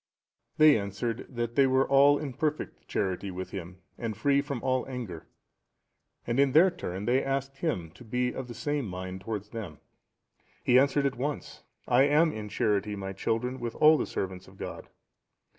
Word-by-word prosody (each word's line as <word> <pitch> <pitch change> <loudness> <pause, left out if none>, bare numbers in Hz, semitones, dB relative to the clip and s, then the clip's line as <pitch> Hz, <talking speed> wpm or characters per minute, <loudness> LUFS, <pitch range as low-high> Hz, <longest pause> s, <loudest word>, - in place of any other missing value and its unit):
They 155 -6 +7
answered, 110 +4 -4
that 120 -2 -3
they 135 +2 +5
were 130 +1 +3
all 140 +1 +6
in 145 -3 -5
perfect 155 +3 -3
charity 95 0 -2
with 95 0 -6
him, 95 -1 -8 0.2
and 115 -3 -3
free 140 0 +3
from 140 -4 -5
all 130 -1 +1
anger; 120 -11 -6 1.0
and 120 +3 0
in 140 -2 +4
their 180 +4 +7
turn 100 - -5
they 125 +2 +2
asked 135 0 -2
him 95 - -2
to 95 - -15
be 125 +2 -1
of 130 - -5
the 120 - -8
same 145 0 -2
mind 95 0 -6
towards 105 0 -5
them. 100 -10 -7 0.9
He 125 +1 +6
answered 140 +1 +2
at 135 - 0
once, 145 +2 -4 0.3
"I 130 +2 +5
am 155 +3 +4
in 105 -1 -6
charity, 105 0 0
my 95 -1 -5
children, 125 +6 -2
with 120 -1 -4
all 155 +1 +7
the - - -1
servants 95 -1 -4
of - - -16
God." - - -7
125 Hz, 180 wpm, -29 LUFS, 100-140 Hz, 1.0 s, They